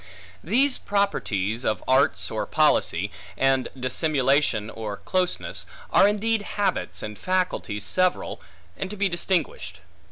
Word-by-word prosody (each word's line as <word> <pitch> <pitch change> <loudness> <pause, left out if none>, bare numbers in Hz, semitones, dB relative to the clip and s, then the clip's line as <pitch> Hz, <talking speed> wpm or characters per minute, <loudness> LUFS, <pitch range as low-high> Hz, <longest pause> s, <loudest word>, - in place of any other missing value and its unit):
These 255 - +2
properties, 115 - -1
of 105 -6 -1
arts 130 +2 +2
or - - -2
policy, 100 +5 +2 0.3
and 135 -1 +2
dissimulation 135 -4 +1
or 105 -2 -5
closeness, 185 - -2 0.2
are 195 - +6
indeed 215 +1 +1 0.2
habits 205 - -1
and 105 -1 -6
faculties 180 - -1
several, 185 0 0 0.3
and 190 - -4
to 210 - -7
be 200 0 +2
distinguished. 175 - -1
150 Hz, 120 wpm, -25 LUFS, -, 0.3 s, are